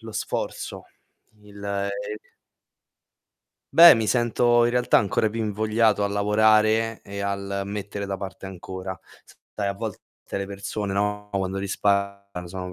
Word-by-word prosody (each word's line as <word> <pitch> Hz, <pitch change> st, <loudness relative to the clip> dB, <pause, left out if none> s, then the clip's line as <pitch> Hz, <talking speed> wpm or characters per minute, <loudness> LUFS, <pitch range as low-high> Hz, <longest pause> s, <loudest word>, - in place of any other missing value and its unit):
lo 110 Hz, -1 st, -9 dB
sforzo, -, -, -4 dB, 0.6 s
il, 100 Hz, -1 st, -13 dB
ehm 100 Hz, 0 st, -2 dB, 1.8 s
Beh, 170 Hz, -2 st, +10 dB
mi 110 Hz, -2 st, -1 dB
sento 120 Hz, 0 st, +3 dB
in 120 Hz, -, +1 dB
realtà 125 Hz, 0 st, +4 dB
ancora 105 Hz, +2 st, +1 dB
più 115 Hz, -, -5 dB
invogliato 110 Hz, 0 st, +1 dB
a 100 Hz, -, +1 dB
lavorare 110 Hz, +2 st, +3 dB
e 100 Hz, 0 st, -7 dB
al 100 Hz, 0 st, -2 dB
mettere 100 Hz, 0 st, -5 dB
da 100 Hz, -1 st, -3 dB
parte 95 Hz, 0 st, -7 dB
ancora. 95 Hz, 0 st, -7 dB, 0.6 s
Sai, 100 Hz, -2 st, -1 dB
a 100 Hz, -, -2 dB
volte 110 Hz, -1 st, -5 dB, 0.4 s
le 100 Hz, -, -2 dB
persone, 100 Hz, 0 st, -4 dB
no, 105 Hz, +1 st, -1 dB
quando 95 Hz, -1 st, -2 dB
risparmiano 100 Hz, -2 st, -1 dB
sono 95 Hz, 0 st, -6 dB
100 Hz, 135 wpm, -24 LUFS, 100-110 Hz, 1.8 s, Beh